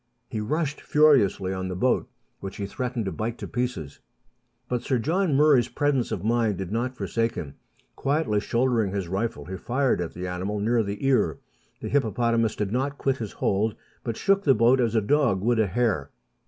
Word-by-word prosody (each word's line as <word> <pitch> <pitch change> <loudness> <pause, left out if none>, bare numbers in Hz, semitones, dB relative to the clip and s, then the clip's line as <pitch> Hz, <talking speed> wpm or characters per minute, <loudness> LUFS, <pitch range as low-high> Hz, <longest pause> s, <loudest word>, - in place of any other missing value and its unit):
He 110 - -4
rushed 150 +6 -2
furiously 125 -11 +3
on 95 0 -3
the 90 - -4
boat, 125 +7 +1 0.3
which 100 0 -7
he 100 - -3
threatened 125 +2 -3
to 95 - -2
bite 110 +7 -3
to - - -6
pieces. 120 - -3 0.7
But 125 -1 -1
Sir 130 - 0
John 165 - +1
Murray's 140 -5 +5
presence 135 0 0
of - - -3
mind 115 -3 +1
did 95 0 -5
not 125 +3 -2
forsake 115 0 -1
him. 70 -4 -6 0.4
Quietly 140 -7 0
shouldering 115 -3 +1
his 100 -3 -2
rifle, 95 -4 -2
he 95 +4 -6
fired 125 +1 0
at 85 - -5
the 90 +1 -5
animal 90 +3 -3
near 115 +3 +2
the 100 +4 -4
ear. 115 - +2 0.4
The - - -4
hippopotamus 115 -3 +1
did 105 -2 -2
not 135 +4 -1
quit 135 -1 0
his 110 -5 -6
hold, 105 +2 0 0.3
but 115 -2 -3
shook 195 0 +2
the 135 -3 +5
boat 120 +4 +4
as 115 -1 0
a 110 - +4
dog 120 -4 +2
would 120 +2 +2
a 110 - +3
hare. 95 - 0
115 Hz, 195 wpm, -25 LUFS, 100-130 Hz, 0.7 s, Murray's